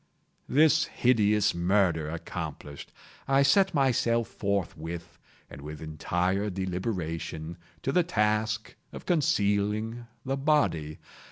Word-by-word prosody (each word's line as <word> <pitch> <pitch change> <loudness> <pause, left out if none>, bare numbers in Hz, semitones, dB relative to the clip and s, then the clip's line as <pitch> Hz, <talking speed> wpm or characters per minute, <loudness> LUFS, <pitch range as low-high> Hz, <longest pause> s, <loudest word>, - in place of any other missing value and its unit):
This 155 +2 +4
hideous 105 -4 +2
murder 85 -3 +1
accomplished, 75 -3 -7 0.4
I 135 +1 +4
set 190 +6 +4
myself 120 -4 +2
forthwith, 85 -4 -4 0.3
and 70 - -11
with 75 +1 -8
entire 90 +6 -1
deliberation, 90 -4 -4 0.3
to 135 - 0
the 180 - +4
task 110 -7 0 0.2
of - - -9
concealing 110 - 0 0.2
the 135 +1 -1
body. 135 - +1
105 Hz, 100 wpm, -28 LUFS, 85-125 Hz, 0.4 s, This